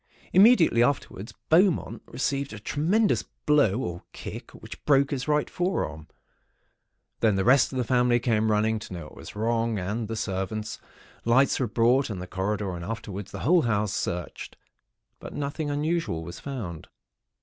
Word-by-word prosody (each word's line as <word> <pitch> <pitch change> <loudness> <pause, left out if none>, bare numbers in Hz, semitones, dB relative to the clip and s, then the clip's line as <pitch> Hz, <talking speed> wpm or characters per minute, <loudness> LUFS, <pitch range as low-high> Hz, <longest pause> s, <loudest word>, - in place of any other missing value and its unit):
Immediately 190 - +6
afterwards, 120 -5 -1 0.2
Beaumont 175 +2 +3
received 140 0 -2
a 110 - -7
tremendous 175 - +1 0.2
blow 140 -8 +3
or 85 -4 -4
kick, - - -8
which - - -11
broke 140 -1 +4
his 135 -1 -3
right 150 -1 +2
forearm. 80 - -2 1.1
Then 110 -3 +3
the 95 - +1
rest 130 +2 +5
of 130 - -4
the 125 - +1
family 125 0 +3
came 110 -2 +1
running, 110 +1 +2
to 105 - -9
know 85 -2 -6
what 75 - -13
was - - -10
wrong, 115 +1 0
and 105 +4 -3
the 115 - -4
servants. 105 +1 -3 0.4
Lights 130 +4 +3
were 130 - +1
brought, 120 +5 +2
and 100 -4 -4
the 90 - -5
corridor 95 +1 -2
and, 85 - -7
afterwards, 100 -1 -6
the 100 - -7
whole 175 +5 +4
house 105 -5 0
searched; 85 0 -4 0.6
but - - -9
nothing 145 +1 -3
unusual 150 - -1
was 85 +1 -8
found. 105 - -6
115 Hz, 160 wpm, -26 LUFS, 100-140 Hz, 1.1 s, Immediately